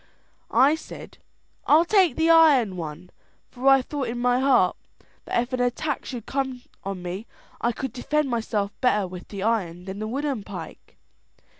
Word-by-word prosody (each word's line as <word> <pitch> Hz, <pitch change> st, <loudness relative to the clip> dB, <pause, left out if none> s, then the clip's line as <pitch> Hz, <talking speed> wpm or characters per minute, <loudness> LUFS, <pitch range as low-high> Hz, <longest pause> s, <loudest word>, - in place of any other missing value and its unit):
I 265 Hz, +6 st, +5 dB
said, 320 Hz, -, -9 dB, 0.5 s
'I'll 315 Hz, +3 st, +6 dB
take 370 Hz, -, +3 dB
the 325 Hz, +1 st, +3 dB
iron 285 Hz, -, +5 dB
one;' 165 Hz, +1 st, -7 dB, 0.4 s
for 255 Hz, +2 st, -3 dB
I 270 Hz, -1 st, +6 dB
thought 280 Hz, -1 st, -4 dB
in 235 Hz, +1 st, -4 dB
my 245 Hz, +1 st, +2 dB
heart 255 Hz, -9 st, +3 dB, 0.5 s
that -, -, 0 dB
if 245 Hz, +2 st, -3 dB
an 255 Hz, -, -1 dB
attack 250 Hz, +4 st, -1 dB
should 240 Hz, -4 st, -6 dB
come 265 Hz, -2 st, -3 dB, 0.2 s
on 195 Hz, -2 st, -5 dB
me, 185 Hz, +5 st, -5 dB, 0.3 s
I 235 Hz, -, +2 dB
could 255 Hz, +1 st, -5 dB
defend 300 Hz, +4 st, 0 dB
myself 220 Hz, -4 st, -1 dB
better 210 Hz, -6 st, +2 dB
with 180 Hz, 0 st, -9 dB
the 200 Hz, -2 st, -6 dB
iron 180 Hz, -6 st, -1 dB
than 195 Hz, +1 st, -6 dB
the 215 Hz, -, -3 dB
wooden 270 Hz, 0 st, -2 dB
pike. -, -, -10 dB
245 Hz, 170 wpm, -24 LUFS, 200-275 Hz, 0.5 s, I'll